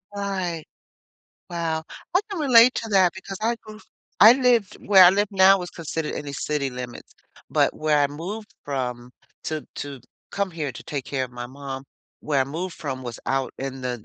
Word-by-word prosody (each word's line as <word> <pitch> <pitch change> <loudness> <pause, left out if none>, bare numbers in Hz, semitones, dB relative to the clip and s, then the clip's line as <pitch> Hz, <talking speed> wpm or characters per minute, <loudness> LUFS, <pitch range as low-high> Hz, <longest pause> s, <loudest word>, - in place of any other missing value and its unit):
Right. 185 -5 -3 0.9
Wow. 165 -2 -2 0.3
I 365 - +5
can 395 - -4
relate 250 -3 +7
to 225 - -3
that 190 -3 +4
because 190 0 -8
I 235 +2 +1
grew 215 0 -12 0.4
I 220 +3 +11
lived 245 -6 +2
where 195 -2 +8
I 175 - +9
live 205 +2 +2
now 195 0 +6
was 180 -1 -6
considered 160 -1 -4
in - - -5
the 140 - -6
city 140 0 -2
limits, 125 -1 -8 0.4
but - - +2
where 155 -1 +1
I 145 - +4
moved 180 +10 -7
from 125 -3 -4 0.3
to 155 -1 -4
to 140 -2 -6 0.3
come 200 -1 -1
here 155 -4 -3
to - - -10
take 140 -3 -4
care 135 -2 -2
of 125 - -11
my 120 0 -6
mom, 135 +1 -7 0.4
where 145 -3 0
I - - +3
moved 165 +6 -5
from 135 -3 -5
was 120 -2 -6
out 135 0 0
in 135 0 -5
the 125 -4 -4
160 Hz, 190 wpm, -24 LUFS, 135-195 Hz, 0.9 s, I